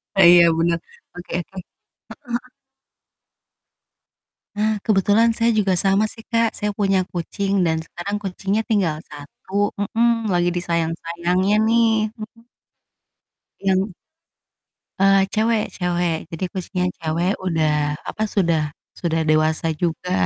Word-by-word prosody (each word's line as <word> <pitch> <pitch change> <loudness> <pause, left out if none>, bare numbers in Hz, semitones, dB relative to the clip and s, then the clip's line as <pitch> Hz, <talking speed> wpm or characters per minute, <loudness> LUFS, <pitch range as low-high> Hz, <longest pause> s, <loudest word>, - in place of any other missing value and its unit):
E 195 - +5
iya 170 -1 +7
bener. 170 0 +1 0.4
Oke 180 - -9
oke. 190 +3 -16
Heeh - - -25 0.7
heeh. 240 +1 -3 2.1
Nah, 215 0 0
kebetulan 210 +3 +4
saya 230 0 +2
juga 205 -4 +2
sama 195 +4 +2
sih, 225 +1 -12
Kak. 230 -1 +2
Saya 210 -1 -2
punya 195 -2 +2
kucing 195 +3 -2
dan 160 - +1
sekarang 200 +5 -5
kucingnya 195 +3 -1
tinggal 195 -9 +1
1. 185 +7 -4
Mhm, 225 +1 +1
lagi 175 0 +2
disayang-sayangnya 170 +2 0
nih, 225 -1 +3
mhm. 230 +1 -11 1.1
Yang 195 0 +1 1.1
Eee, 195 0 +4
cewek 220 0 +2
cewek. 175 -2 0 0.2
Jadi 165 +3 -5
kucingnya 185 -1 -2
cewek 165 +3 -1
udah, 160 -3 +1 0.4
apa, 215 - -3
sudah 170 -5 +2 0.4
sudah 165 -2 0
dewasa 155 +1 +2 0.2
juga. 175 +1 -2
195 Hz, 120 wpm, -21 LUFS, 170-215 Hz, 2.1 s, iya